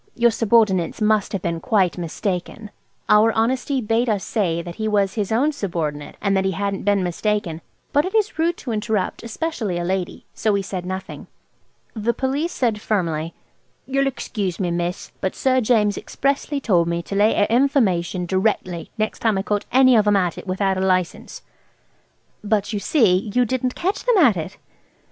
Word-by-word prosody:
Your 235 0 +4
subordinates 220 -6 +2
must 215 -1 +2
have 195 - -3
been 170 -1 -2
quite 195 -4 +1
mistaken." 180 +4 -4 0.4
Our 210 +2 +5
honesty 255 +4 0
bade 230 +2 +1
us 205 -3 0
say 170 -6 -1
that 175 -1 -8
he 220 - -2
was 200 -2 +1
his 210 -3 -2
own 265 +7 +2
subordinate, 165 - -4
and 200 -1 +1
that 190 - +2
he 190 0 0
hadn't 200 +2 -3
been 200 -2 +2
mistaken; 180 -2 -2 0.3
but 290 - +4
it 380 +3 -4
is 425 -6 +1
rude 335 +1 +1
to 245 - -6
interrupt, 215 -3 -1
especially 230 - -3
a 175 - -2
lady, 185 0 -3
so 215 - 0
we 200 -1 0
said 185 -2 -5
nothing. 190 0 -6 0.7
The 230 +1 -1
Police 285 +6 -1
said 225 -5 -1
firmly, 165 -7 -1 0.5
"you'll 275 +1 +1
excuse 205 -8 -3
me, 180 -3 -1
miss, 175 +1 -3
but 190 - -2
Sir 260 -1 +2
James 215 -3 +2
expressly 280 +1 -1
told 180 -10 +2
me 170 0 -2
to 200 - -7
lay 205 +2 +3
a 205 - +3
information 200 -10 +2
directly 185 -2 -1
next 215 0 -2
time 220 -3 +1
I 190 - -1
caught 205 0 -1
any 260 -1 +6
of 215 -2 +3
'em 205 - +4
at 180 -4 +1
it - - -10
without 190 0 0
a - - -1
license." 185 - -1 1.0
"But, 210 0 0
you 205 - -1
see, 205 - +2
you 250 0 +4
didn't 255 +1 -1
catch 385 +4 -2
them 485 -3 +3
at 270 - +5
it." 175 +3 -5
210 Hz, 185 wpm, -21 LUFS, 185-235 Hz, 1.0 s, any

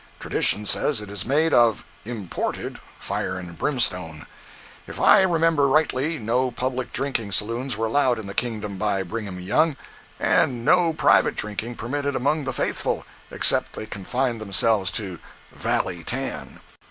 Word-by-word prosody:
Tradition 105 - +1
says 140 +3 +1
it 105 -1 -7
is 100 0 -4
made 155 +4 +2
of 120 -3 +4 0.2
(imported) 110 -6 -4 0.2
fire 95 0 -3
and 90 -2 -8
brimstone. 90 - -1 0.6
If - - -7
I - - +7
remember 165 -5 +3
rightly 155 +1 +1
no 125 +2 0
public 125 +1 -3
drinking 125 -7 -2
saloons 115 +4 -1
were 115 - 0
allowed 125 +1 +2
in 110 - -6
the 100 - -6
kingdom 105 -4 -2
by 100 -1 0
Brigham 100 -1 -5
Young, 145 - +2 0.4
and 120 -3 +2
no 175 -2 +4
private 160 - +3
drinking 110 +3 -3
permitted 140 +4 -2
among 145 +3 0
the 130 - -1
faithful, 120 - -1 0.2
except - - +1
they - - -6
confined 120 +4 -2
themselves 100 -1 +1
to 95 -6 -2 0.3
"valley 90 -3 -2
tan." 135 +9 -5
115 Hz, 145 wpm, -24 LUFS, 100-135 Hz, 0.6 s, I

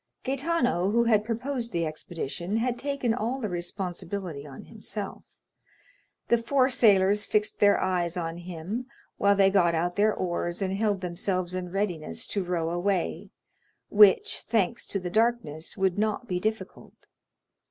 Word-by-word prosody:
Gaetano, 265 - 0
who 235 +3 +3
had 220 -3 +3
proposed 235 +2 -3
the 170 -3 0
expedition, 165 +4 -4
had 240 +1 -1
taken 280 -5 -1
all 245 +3 -2
the 215 -5 -3
responsibility 175 -3 -5
on 135 - -10
himself; 210 -2 -6 1.1
the 235 - +3
four 260 +2 +2
sailors 210 -5 +4
fixed 210 0 0
their 205 -1 +5
eyes 175 -2 0
on 165 -1 -3
him, 180 +8 -5 0.3
while 200 0 +4
they 195 -1 +5
got 175 -4 +3
out 175 +2 -1
their 215 +1 +4
oars 175 -2 -2
and 190 -1 -1
held 205 -2 0
themselves 180 0 -2
in 185 -1 -3
readiness 175 - -2
to 200 - -2
row 170 -2 -1
away, 175 +1 -1 0.6
which, 205 -2 +5
thanks 225 0 -1
to 200 - -1
the 180 -1 -5
darkness, 220 -9 0
would 190 0 +1
not 215 +3 -1
be 180 -4 -1
difficult. 220 +4 -5
195 Hz, 150 wpm, -27 LUFS, 175-225 Hz, 1.1 s, their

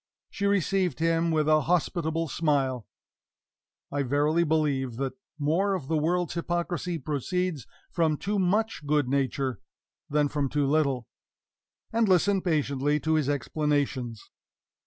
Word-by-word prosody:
She 200 - -1
received 195 -2 +1
him 165 +1 +1
with 155 -2 +1
a 155 0 +5
hospitable 165 0 0
smile 135 -7 0 1.0
(I 145 - 0
verily 145 +5 +2
believe 145 -6 0
that 135 +2 -2 0.2
more 170 +7 +1
of 145 -8 -6
the 160 - +1
world's 170 +2 0
hypocrisy 175 0 -2
proceeds 155 +1 -2 0.2
from 160 -3 +1
too 205 +5 -1
much 200 0 +1
good 150 -2 +2
nature 135 -1 -1 0.5
than 150 0 +2
from 140 -1 -1
too 145 +1 +1
little) 140 -4 +1 0.9
and 225 -2 +2
listened 190 +1 +3
patiently 145 -3 +1
to 160 - +1
his 155 -3 +1
explanations. 145 -4 -1
155 Hz, 130 wpm, -27 LUFS, 140-175 Hz, 1.0 s, a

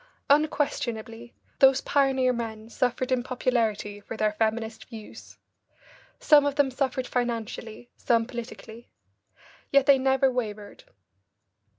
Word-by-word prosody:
Unquestionably 240 -6 -1 0.2
those 270 -1 +6
pioneer 265 -3 +2
men 225 -2 -6
suffered 250 0 -1
in 255 -1 +2
popularity 230 -5 -1
for 210 +2 -8
their 215 -1 +1
feminist 220 +1 -2
views. 220 -3 -12 0.8
Some 295 -2 +6
of 285 -1 -1
them 285 -2 +2
suffered 260 -1 -2
financially, 230 -2 -4
some 230 -1 +1
politically. 235 -1 -9 0.8
Yet 275 -1 +4
they 275 -1 +6
never 265 0 +2
wavered. 210 -4 -5
245 Hz, 110 wpm, -26 LUFS, 225-265 Hz, 0.8 s, those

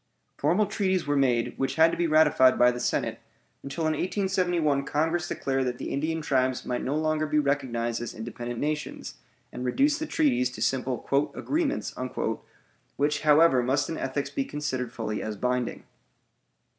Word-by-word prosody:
Formal 175 +9 +2
treaties 190 -4 0
were 145 0 0
made 125 -4 +2
which 135 0 -1
had 160 +1 +5
to - - -2
be 170 - +1
ratified 150 -5 +5
by 125 0 +5
the 120 - -5
Senate, 120 - -1 0.4
until 140 +4 -5
in 155 0 +2
1871 175 -5 0
Congress 165 +5 0
declared 135 -4 -1
that 125 0 -3
the - - -5
Indian 160 +3 -1
tribes 130 -3 0
might 125 -1 -2
no 135 - -2
longer 155 0 0
be 150 - 0
recognized 125 -6 0
as 120 - -6
independent 120 +1 -6
nations, 150 +1 -4 0.3
and 125 - -6
reduced 285 - +2
the 315 - -3
treaties 280 - +2
to 125 - -10
simple 125 +1 -1 0.3
"agreements," 305 -1 -1 1.0
which, 150 +1 0
however, 150 -3 +5
must 135 +3 0
in 160 - -3
ethics 135 +2 -3
be 275 - -1
considered 130 - -3
fully 110 -3 -4
as 110 -1 -4
binding. 125 +1 -1
145 Hz, 165 wpm, -27 LUFS, 125-160 Hz, 1.0 s, had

